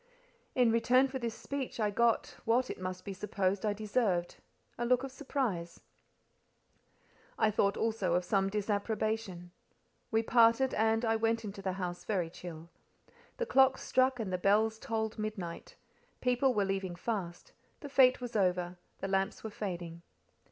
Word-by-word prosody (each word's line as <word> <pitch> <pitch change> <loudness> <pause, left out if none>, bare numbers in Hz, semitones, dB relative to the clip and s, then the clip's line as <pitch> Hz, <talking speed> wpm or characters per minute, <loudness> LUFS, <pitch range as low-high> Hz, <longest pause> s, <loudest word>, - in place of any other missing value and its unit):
In 245 -3 +4
return 250 +3 +4
for 265 0 -5
this 235 -2 -3
speech 275 -4 -5
I 210 -2 +1
got—what, 235 +2 +1
it - - -8
must 185 0 -5
be 200 - -4
supposed, 195 0 -1
I 210 -1 +1
deserved—a 205 -1 -2
look 250 +1 +2
of 270 - -5
surprise: 245 - -3 1.6
I 215 - +3
thought 200 -1 +1
also 215 -6 0
of 180 0 0
some 195 0 +1
disapprobation. 210 -2 -2 0.6
We 225 0 +2
parted, 235 +3 +4
and 225 +2 +2
I 225 0 +2
went 225 0 0
into 200 -1 -7
the 190 -1 -2
house 180 -2 -4
very 180 -6 -1
chill. 170 -2 -9 0.7
The 485 - -1
clocks 265 - +4
struck 255 0 +2
and 200 -5 -3
the 180 - 0
bells 215 +3 +2
tolled 220 -4 -3
midnight; 210 -6 -5 0.4
people 250 +1 +2
were 205 -1 +2
leaving 195 -2 -2
fast: 175 -3 -4 0.3
the 290 - -6
fête 260 -2 +5
was 245 -2 -6
over; 180 -3 +1 0.2
the 195 - -2
lamps 195 0 -1
were 220 - -5
fading. 175 -5 -5
215 Hz, 150 wpm, -32 LUFS, 185-235 Hz, 1.6 s, fête